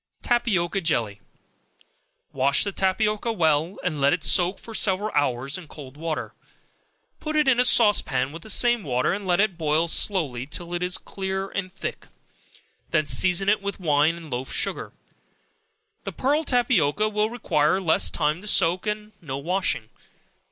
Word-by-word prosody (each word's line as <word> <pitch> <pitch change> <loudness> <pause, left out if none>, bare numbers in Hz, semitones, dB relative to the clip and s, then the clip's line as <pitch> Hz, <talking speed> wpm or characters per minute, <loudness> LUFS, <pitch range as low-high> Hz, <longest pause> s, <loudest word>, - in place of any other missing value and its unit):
Tapioca 195 -6 0
Jelly. 115 - -1 1.1
Wash 140 +1 +2
the 200 - -2
tapioca 210 +4 0
well, 160 -2 +1
and 155 -5 -2
let 140 +1 +4
it 170 -3 -3
soak 180 +3 +3
for 225 - -11
several 205 0 +1
hours 140 +1 0
in 175 - -13
cold 140 -3 -12
water; 160 +1 -4 0.9
put 310 0 -4
it 300 -2 +2
in 255 -2 +3
a - - +5
sauce 220 -4 +5
pan 130 +1 -2
with 165 +2 -9
the 220 - -11
same 240 +2 +3
water, 130 -1 0
and 200 0 -5
let 175 0 +2
it 195 -4 +1
boil 160 +1 +1
slowly 150 - 0
till 170 +3 -4
it 175 - -2
is 180 0 -1
clear 190 0 -5
and 185 -2 -4
thick; - - -7 0.8
then 155 -2 +1
season 180 +8 +4
it 210 0 +2
with 200 0 -5
wine 155 -1 +2
and 165 -3 -11
loaf 125 +2 -4
sugar. - - -1 1.1
The - - -5
pearl 290 +4 0
tapioca 215 - +2
will 210 0 0
require 185 -8 0
less 170 -4 +2
time 155 +2 -1
to 210 - -9
soak, 180 0 +2
and 210 0 -4
no 135 -5 -5
washing. 150 - -2
180 Hz, 165 wpm, -24 LUFS, 150-210 Hz, 1.1 s, a